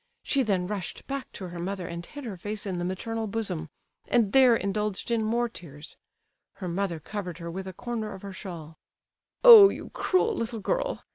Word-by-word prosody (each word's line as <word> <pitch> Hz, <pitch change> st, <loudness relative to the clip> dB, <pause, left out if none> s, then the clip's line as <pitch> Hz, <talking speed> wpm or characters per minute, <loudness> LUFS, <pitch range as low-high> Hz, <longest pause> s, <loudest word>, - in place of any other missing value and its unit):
She 275 Hz, -, +1 dB
then 195 Hz, -7 st, +1 dB
rushed 200 Hz, -1 st, -5 dB
back 275 Hz, -1 st, -5 dB
to 185 Hz, -2 st, -7 dB
her 175 Hz, 0 st, -7 dB
mother 185 Hz, +1 st, -4 dB
and 170 Hz, 0 st, -6 dB
hid 290 Hz, +10 st, -9 dB
her 225 Hz, -6 st, -5 dB
face 205 Hz, +4 st, -5 dB
in 185 Hz, -3 st, -3 dB
the -, -, -2 dB
maternal 220 Hz, +5 st, -3 dB
bosom, 195 Hz, -7 st, -3 dB, 0.4 s
and 225 Hz, -5 st, +2 dB
there 260 Hz, -3 st, +7 dB
indulged 210 Hz, +1 st, -2 dB
in 230 Hz, -1 st, +1 dB
more 235 Hz, +2 st, +1 dB
tears. 155 Hz, -8 st, -11 dB, 0.6 s
Her 185 Hz, -, -7 dB
mother 175 Hz, -1 st, -2 dB
covered 180 Hz, 0 st, -6 dB
her 170 Hz, -1 st, -6 dB
with 190 Hz, +2 st, -6 dB
a 190 Hz, -, -6 dB
corner 225 Hz, +1 st, -4 dB
of 190 Hz, -, -13 dB
her 200 Hz, -1 st, -7 dB
shawl. 165 Hz, -5 st, -9 dB, 0.6 s
"Oh, 450 Hz, -5 st, +11 dB
you -, -, -7 dB
cruel 420 Hz, +5 st, +1 dB
little 230 Hz, -, -3 dB
girl! -, -, -2 dB
200 Hz, 195 wpm, -27 LUFS, 180-235 Hz, 0.6 s, Oh